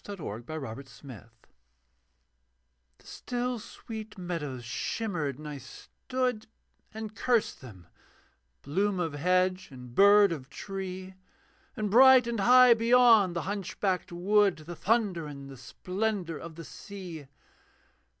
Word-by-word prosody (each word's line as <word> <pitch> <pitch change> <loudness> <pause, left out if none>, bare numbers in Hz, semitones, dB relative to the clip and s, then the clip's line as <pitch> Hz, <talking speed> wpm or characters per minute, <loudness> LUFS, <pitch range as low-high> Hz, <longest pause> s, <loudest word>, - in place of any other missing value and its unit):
THE 205 - -7
HOPE 120 - -7
OF 140 -8 -5
THE 135 0 -11
STREETS 120 -7 -12 1.7
The - - -25
still 245 0 -4
sweet 220 0 -9
meadows 150 -9 -5
shimmered: 155 - -3
and 150 0 -9
I 145 -2 -6
stood 250 - -4 0.4
And 220 -1 -7
cursed 235 0 0
them, 100 -9 -13 0.8
bloom 190 +6 0
of 165 -4 -2
hedge 185 +4 +1
and 125 -3 -12
bird 200 +3 +6
of 140 -5 -6
tree, 190 +2 -7 0.6
And 210 -2 -2
bright 260 +2 +7
and 235 -2 -3
high 250 +3 +7
beyond 230 -5 +5
the 170 - -2
hunch 200 -1 -5
backed 185 -4 -1
wood 195 +2 +2
The 175 +2 -7
thunder 195 -5 0
and 140 -2 -9
the - - -10
splendour 180 - -3
of 165 -1 -9
the 165 0 -9
sea. 180 -8 -9
185 Hz, 130 wpm, -29 LUFS, 150-215 Hz, 1.7 s, bright